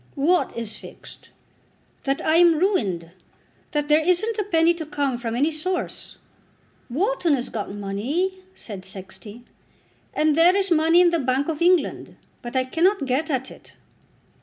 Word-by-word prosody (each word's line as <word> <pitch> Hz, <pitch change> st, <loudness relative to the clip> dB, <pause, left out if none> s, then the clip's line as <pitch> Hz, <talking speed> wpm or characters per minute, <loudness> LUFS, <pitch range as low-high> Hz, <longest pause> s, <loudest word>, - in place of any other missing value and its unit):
"What 320 Hz, +3 st, +1 dB
is 230 Hz, -2 st, -3 dB
fixed?" -, -, -13 dB, 0.8 s
"That 275 Hz, 0 st, -1 dB
I 315 Hz, +1 st, +3 dB
am 340 Hz, -2 st, +5 dB
ruined. 200 Hz, -, 0 dB, 0.6 s
That 295 Hz, -1 st, -2 dB
there 300 Hz, +1 st, +5 dB
isn't 365 Hz, +7 st, 0 dB
a -, -, +1 dB
penny 335 Hz, -3 st, +3 dB
to 335 Hz, -1 st, -6 dB
come 280 Hz, -5 st, -2 dB
from 230 Hz, -1 st, -3 dB
any 290 Hz, +6 st, +2 dB
source." 360 Hz, +4 st, -3 dB, 0.7 s
"Wharton 345 Hz, -, +1 dB
has 250 Hz, -1 st, -4 dB
got 210 Hz, -3 st, -5 dB
money," 255 Hz, -, -2 dB, 0.2 s
said 200 Hz, -5 st, -8 dB
Sexty. 190 Hz, +4 st, -9 dB, 0.7 s
"And 305 Hz, -1 st, +2 dB
there 340 Hz, +3 st, +5 dB
is 390 Hz, -2 st, 0 dB
money 330 Hz, +2 st, +5 dB
in 350 Hz, -1 st, +4 dB
the 335 Hz, -, +1 dB
Bank 265 Hz, +2 st, 0 dB
of 315 Hz, -1 st, -3 dB
England, 355 Hz, 0 st, +1 dB, 0.3 s
but 240 Hz, +2 st, -8 dB
I 260 Hz, -, +3 dB
cannot 330 Hz, +5 st, +1 dB
get 270 Hz, +5 st, -1 dB
at 265 Hz, -2 st, -2 dB
it." -, -, -16 dB
305 Hz, 160 wpm, -23 LUFS, 245-345 Hz, 0.8 s, am